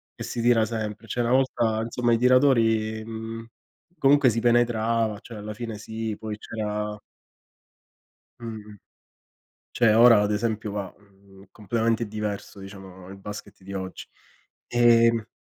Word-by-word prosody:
e - - -7
si 120 - -4
tira 115 -2 +4
sempre, 110 -1 -5
cioè 120 +2 -1
una 120 +2 +1
volta, 120 -4 +1
insomma 120 0 0
i - - +4
tiratori 115 -4 +3
mhmm, 115 0 -7 0.5
comunque 140 -1 +5
si 115 +1 -1
penetrava, 115 -2 +1
cioè 115 -3 -10
alla 105 +1 -6
fine 115 -1 -6
sì, 110 0 -5
poi 110 -1 -5
c'era 105 -1 -4 1.4
Mh-mh. 110 -3 -8 1.0
Cioè 110 -3 +3
ora 115 -2 +7
ad 105 0 0
esempio 110 -1 -2
va, 100 -3 -5
mhmm, 100 -1 -20
completamente 115 +2 -1
diverso, 105 -1 -5
diciamo, 95 -2 -11
il 95 0 -10
basket 105 -1 -9
di 100 +1 -9
oggi. 95 -1 -6 0.6
Ehm 115 -2 +4
110 Hz, 135 wpm, -25 LUFS, 105-115 Hz, 1.4 s, ora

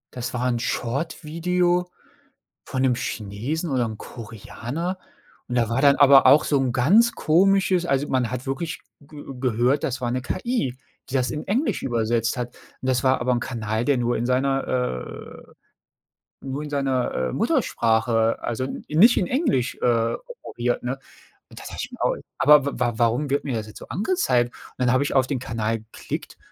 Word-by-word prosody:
Das 125 0 -5
war 125 0 -1
'n 120 -2 0
Short-Video 170 +8 -1 0.8
von 130 - -3
'nem 130 -2 +3
Chinesen 120 - -4
oder 125 -3 +1
'nem 110 -1 -7
Koreaner 120 - -6 0.5
und 125 - -3
da 115 -2 +2
war 115 +3 0
dann 140 0 +6
aber 140 -1 +7
auch 150 +2 +7
so 145 - +1
'n 130 -2 0
ganz 200 - +4
komisches 185 +2 +3
also, 140 -2 0
man 125 -3 +1
hat 125 0 -5
wirklich 140 +5 -4 0.2
ge 145 0 -12 0.2
gehört, 125 +2 +1
das 130 -1 -3
war 120 -1 -1
'ne 125 +1 -1
KI, 185 - -2 0.3
die - - -9
das 130 -1 +1
in 150 - -5
Englisch 245 +10 0
übersetzt 115 -1 0
hat, 125 0 -3 0.3
und 130 - -4
das 130 0 +1
war 130 -1 +3
aber 125 +1 +1
'n 120 - +1
Kanal, 115 -2 -3
der 145 -2 +2
nur 120 0 0
in 115 - -2
seiner 135 +2 +1
äh, 125 - -4 0.9
nur 135 +2 -5
in 150 - -7
seiner, 135 -3 0 0.2
äh, - - -7
Muttersprache, 115 - +1
also 120 +2 -2
n 135 - -6
nicht 195 +11 +6
in 180 - +1
Englisch, 250 - 0
äh, 115 -1 +2 0.3
operiert, 120 0 -2
ne? 130 +2 -2 0.5
Und - - -12
da - - -10
dachte - - -8
ich - - -5
mir - - -11
auch: - - +2 0.2
„Aber 150 -1 +6
w - - +1
w 120 -1 +2
warum 120 +5 +1
wird 140 - +1
mir 135 - -2
das 110 -2 -3
jetzt 105 - -11
so - - -11
angezeigt?” 170 - +1
und - - -16
dann 120 - +3
habe 130 +2 +3
ich - - -2
auf 130 -2 +4
den 140 - -1
Kanal 115 -2 -2
geklickt 110 +1 -7
130 Hz, 190 wpm, -23 LUFS, 120-150 Hz, 0.9 s, aber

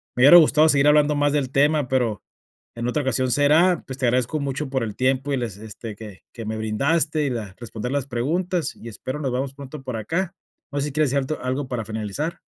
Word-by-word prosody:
Me 125 - +2
hubiera 145 +5 +9
gustado 155 -1 +6
seguir 140 0 +4
hablando 150 0 +4
más 145 0 +2
del 135 -3 0
tema, 145 0 +2
pero 120 -6 0 0.5
en 120 0 -4
otra 145 +4 0
ocasión 130 0 0
será, 155 +6 +4
pues 130 - -6
te 130 - +1
agradezco 125 +5 +1
mucho 140 +1 -3
por 130 -2 -1
el 105 -2 -5
tiempo 130 +2 +1
y 135 - +1
les 115 -6 -4
este, 110 0 -8
que 105 -3 -11
que 115 - -7
me 110 0 -3
brindaste 150 +8 0
y - - 0
la 105 -5 -5
responder 120 +1 -5
las 140 -2 -1
preguntas, 165 +7 -1
y 115 - -10
espero 130 +6 -6
nos 135 -4 -2
veamos 135 +2 -2
pronto 140 +1 -9
por 130 -3 -4
acá. 170 - -2 0.4
¿No 145 - -2
sé 145 - -1
si 145 - -6
quieres 150 -2 +1
decir 140 - +2
alto 140 +3 -4
algo 130 +2 -2
para 120 -4 -3
finalizar? 110 - -4
135 Hz, 230 wpm, -23 LUFS, 120-150 Hz, 0.5 s, hubiera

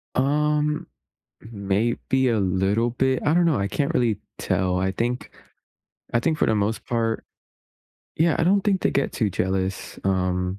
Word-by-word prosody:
Um, 150 +2 +1 0.6
maybe 115 +5 0
a 115 - +1
little 95 +5 +1
bit? 130 +1 0
I 150 - +3
don't 175 0 +4
know, 155 -10 +2
I 100 - 0
can't 140 +7 -1
really 115 -4 +1 0.2
tell. 95 -1 0
I 95 +1 0
think 120 +5 -3 0.8
I 120 - +4
think 155 +5 0
for - - +2
the 110 - +2
most 105 +2 -1
part 115 -1 -1 0.9
Yeah, 160 0 +3
I 165 - +2
don't 195 +3 +3
think 195 -2 +1
they - - +2
get 140 - 0
too 110 -4 0
jealous. 95 +1 -2
Um, 90 0 0
115 Hz, 165 wpm, -24 LUFS, 95-145 Hz, 0.9 s, don't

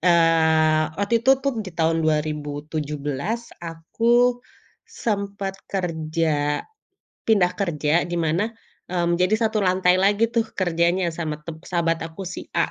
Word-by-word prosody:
eee, 160 -2 +4
waktu 210 +3 +1
itu 260 - +3
tuh, 265 -5 0
di 195 -3 -6
tahun 165 0 +2
2017, 150 - -2
aku 230 +9 +1 0.5
sempet 200 - -3
kerja 160 -5 -1 0.6
pindah 195 -5 +4
kerja, 165 -4 +1
di 175 - -3
mana, 165 +8 0 0.4
mmm, 175 -1 +1
jadi 185 +4 +3
satu 220 -1 +1
lantai 185 -1 +3
lagi 205 +4 +3
tuh, 230 -2 +1
kerjanya 175 0 +1
sama 155 -3 -3
tep 160 +1 -9
sahabat 165 -2 0
aku 165 +4 -9
si 190 - -7
A - - +1
170 Hz, 130 wpm, -23 LUFS, 160-200 Hz, 0.6 s, eee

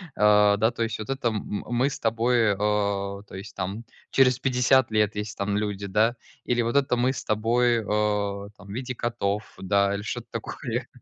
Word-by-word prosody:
А, 105 -1 +5
да 110 +3 +2
то 120 - -6
есть: 110 -2 -2
"Вот 110 - -7
это 135 -2 -1
м 105 -2 -3
мы 120 +3 +2
с - - -6
тобой, 115 -1 +2
а, 100 -1 0
то - - -11
есть 95 +1 -9
там 95 +5 -4 0.3
через 130 -2 +4
50 130 -1 +3
лет 105 -1 +1
если 105 0 -4
там 100 0 -1
люди, 105 -1 -2
да. 110 +4 +2 0.3
Или 120 -1 +1
вот 115 +2 -2
это 135 -3 +3
мы 125 +2 +1
с - - -6
тобой, 115 +2 +2
а, 105 -1 0
там 100 - -14
в - - -9
виде 125 +3 -4
котов". 110 -3 -1 0.2
Да, 100 +1 +2
или 100 - -3
что-то 105 - -5
такое, - - -4
105 Hz, 195 wpm, -25 LUFS, 100-120 Hz, 0.3 s, А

